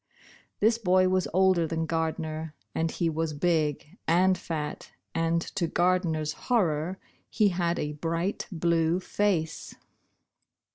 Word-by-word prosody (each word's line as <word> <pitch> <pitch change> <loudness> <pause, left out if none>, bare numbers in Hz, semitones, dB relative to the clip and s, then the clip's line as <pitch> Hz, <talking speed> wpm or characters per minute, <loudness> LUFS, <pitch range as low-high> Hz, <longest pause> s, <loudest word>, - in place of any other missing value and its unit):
This 225 +2 +4
boy 185 -3 +3
was 185 -1 +1
older 185 -2 +3
than 165 0 -1
Gardner, 160 -1 -2 0.2
and 165 0 0
he 170 - -1
was 160 -1 -1
big 150 -1 -1
and 185 +3 +4
fat, 155 -4 -5 0.2
and, 165 0 +1
to 180 -4 0
Gardner's 165 -3 +1 0.2
horror, 180 -6 +1 0.3
he 210 -2 +3
had 175 -1 0
a 150 0 -2
bright 165 +5 -2
blue 170 0 +1
face. 180 -4 -1
165 Hz, 125 wpm, -28 LUFS, 160-185 Hz, 0.3 s, This